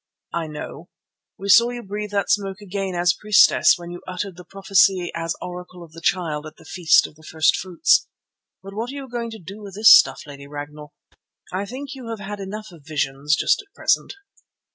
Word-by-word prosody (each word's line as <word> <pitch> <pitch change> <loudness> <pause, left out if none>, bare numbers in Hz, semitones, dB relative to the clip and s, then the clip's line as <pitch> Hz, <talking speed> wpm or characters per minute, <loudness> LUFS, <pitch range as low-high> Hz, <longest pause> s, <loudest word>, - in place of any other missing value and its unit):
"I 170 -1 -2
know. 155 +2 -8 0.5
We 200 +1 -6
saw 235 +4 +7
you 245 -1 -6
breathe 210 +1 -5
that 200 -1 0
smoke 195 -2 0
again 195 -2 -4
as 175 0 +3
priestess 210 -2 +5
when 175 0 -9
you 175 - -8
uttered 185 0 -4
the 180 - -11
prophecy 195 -1 +2
as 165 0 -3
Oracle 180 0 -8
of 165 - -15
the 165 +1 -12
Child 160 -4 -1
at 155 - -12
the - - -17
Feast 175 -3 +4
of - - -9
the 155 - -21
First 160 0 +2
fruits. 315 - +2 0.6
But 195 0 -9
what 225 +4 -4
are 275 - -7
you 275 -1 -7
going 235 -1 -4
to 225 - -8
do 195 +3 -10
with 200 -2 -10
this 215 +2 +9
stuff, - - +3
Lady 140 -1 -11
Ragnall? 150 +1 -9 0.6
I 195 +2 -2
think 270 +5 -7
you 255 -4 -9
have 225 -2 -5
had 205 +1 -6
enough 205 +1 -7
of 165 -4 -16
visions 150 0 0
just - - +2
at 405 -1 -26
present." - - 0
190 Hz, 210 wpm, -22 LUFS, 165-210 Hz, 0.6 s, this